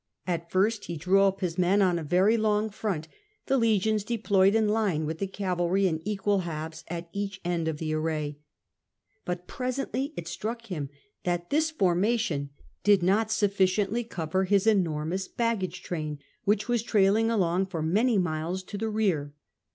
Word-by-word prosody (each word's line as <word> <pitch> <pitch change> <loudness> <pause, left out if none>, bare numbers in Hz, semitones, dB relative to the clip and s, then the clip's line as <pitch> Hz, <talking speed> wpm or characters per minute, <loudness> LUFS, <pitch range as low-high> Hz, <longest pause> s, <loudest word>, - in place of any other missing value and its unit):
At 170 -2 -2
first 205 +3 +1
he 170 - -5
drew 185 +5 +3
up 195 0 +2
his 180 -1 -2
men 185 +3 +3
on 180 -3 +3
a - - -5
very 185 +8 +3
long 215 -1 +1
front, 195 -7 -3 0.4
the 270 - +2
legions 220 -3 +2
deployed 205 -3 +2
in 220 -1 +3
line, 205 -8 +1
with 160 +1 -4
the 195 - -1
cavalry 185 -1 0
in 160 -3 0
equal 205 -1 +1
halves 160 -2 -5
at 170 0 -5
each 200 -1 -3
end 170 -2 0
of 160 -2 -1
the 155 0 -2
array. 155 -2 -2 0.9
But 180 0 -3
presently 260 +3 -3
it 165 - -5
struck 225 +7 -4
him 155 -10 -4 0.3
that 175 -1 -2
this 310 +2 +3
formation 190 - +1 0.3
did 200 -2 +5
not 205 +4 +2
sufficiently 200 +2 +1
cover 185 -3 -2
his 200 +1 +2
enormous 180 -3 +1
baggage 195 -7 -2
train, 155 -4 -4 0.3
which 210 +1 +2
was 240 -2 +1
trailing 215 0 +3
along 190 -4 +1
for 170 -5 -3
many 215 +8 +2
miles 175 +1 -1
to 200 +2 -7
the 225 +1 -1
rear. 175 -10 0
190 Hz, 165 wpm, -27 LUFS, 170-215 Hz, 0.9 s, did